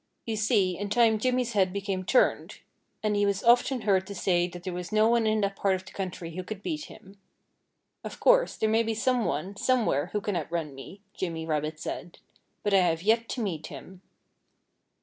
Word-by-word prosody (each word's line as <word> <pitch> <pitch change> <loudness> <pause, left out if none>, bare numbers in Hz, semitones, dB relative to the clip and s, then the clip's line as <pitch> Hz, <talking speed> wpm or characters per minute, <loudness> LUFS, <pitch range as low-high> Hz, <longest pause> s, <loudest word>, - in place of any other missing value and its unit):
You 225 - -2
see, 205 -4 +2
in 205 0 -3
time 225 0 +3
Jimmy's 250 0 0
head 190 -3 +2
became 195 -1 -3
turned. 250 +7 +1 0.4
And 210 -1 +1
he 205 - +2
was 200 -1 0
often 245 +2 +4
heard 190 -3 +2
to 200 - -7
say 175 -1 +1
that 175 0 -10
there 185 - -4
was 175 -1 -6
no 215 +1 +4
one 230 -1 +3
in 215 0 +2
that 200 0 -1
part 195 -1 +1
of 185 0 -7
the - - -12
country 180 -4 -6
who 185 - -4
could 205 +1 -7
beat 305 -2 -3
him. 195 +1 -15 0.8
"Of - - -8
course, - - +4
there 220 - 0
may 220 +1 +3
be 225 -1 -1
some 245 +1 +1
one, 165 +8 -2
somewhere, 220 - +1
who 210 - -2
can 205 -2 -3
outrun 165 -2 -3
me," 155 +9 -11
Jimmy 165 -3 -4
Rabbit 155 0 -2
said. 175 +2 -6 0.5
"But 205 - 0
I 195 - +7
have 170 -2 +1
yet 225 +2 +2
to 245 - -2
meet 170 -7 -3
him." 185 0 -11
200 Hz, 210 wpm, -27 LUFS, 180-220 Hz, 0.8 s, I